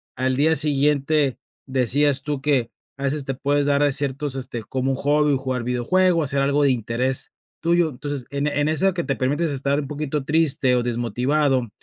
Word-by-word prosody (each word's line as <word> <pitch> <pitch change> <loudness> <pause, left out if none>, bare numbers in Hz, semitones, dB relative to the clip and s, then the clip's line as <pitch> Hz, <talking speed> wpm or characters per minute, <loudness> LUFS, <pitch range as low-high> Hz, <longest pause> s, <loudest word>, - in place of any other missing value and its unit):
al 130 +1 0
día 160 +3 +3
siguiente 145 -1 +2 0.3
decías 135 +2 +2
tú 145 -2 -3
que 135 -5 +1 0.3
a 135 - -7
veces 140 +1 -1
te 135 - -2
puedes 145 +2 0
dar 145 0 +2
ciertos, 140 0 -2
este, 125 -3 -5
como 130 +3 -2
un 135 - 0
hobby, 145 0 +2
jugar 130 -2 -3
videojuegos, 155 +7 +1
hacer 140 0 +1
algo 140 +1 +2
de 140 - +4
interés 125 +2 -1 0.3
tuyo, 170 0 +2
entonces, 145 -1 -6
en 140 +2 -2
en 145 +1 0
eso 185 +4 +2
que 170 - -2
te 135 - -2
permites 145 +5 0
estar 140 +1 -1
un 140 - -7
poquito 150 -1 -3
triste 150 -4 +2
o 120 - +1
desmotivado, 125 +2 0
140 Hz, 185 wpm, -22 LUFS, 130-150 Hz, 0.3 s, de